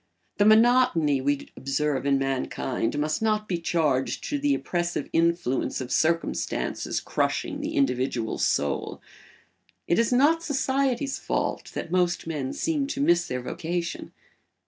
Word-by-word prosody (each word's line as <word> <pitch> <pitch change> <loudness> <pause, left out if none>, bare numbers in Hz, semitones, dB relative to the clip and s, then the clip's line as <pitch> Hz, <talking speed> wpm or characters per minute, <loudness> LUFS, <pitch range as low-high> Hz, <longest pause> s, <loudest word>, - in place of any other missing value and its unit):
The 205 - +5
monotony 215 - +4
we 145 +1 -1
observe 140 0 -1
in 140 -1 +3
mankind 135 -1 -2
must 155 +4 -1
not 215 -1 +1
be 175 -4 -1
charged 155 -6 0
to 290 - -1
the 285 0 +2
oppressive 175 -6 -2
influence 165 -6 +1
of 130 -1 -6
circumstances 165 +1 0
crushing 295 -3 -2
the 310 +2 -4
individual 130 - 0
soul. 70 -1 0 0.9
It 170 - +2
is 230 +1 +2
not 295 +6 +4
society's 275 -2 0
fault - - -2
that 170 - -5
most 180 -1 +1
men 145 -5 -3
seem 300 -4 -1
to 275 - -4
miss 175 -10 +3
their 125 -1 -3
vocation. 170 +5 -4
170 Hz, 135 wpm, -26 LUFS, -, 0.9 s, The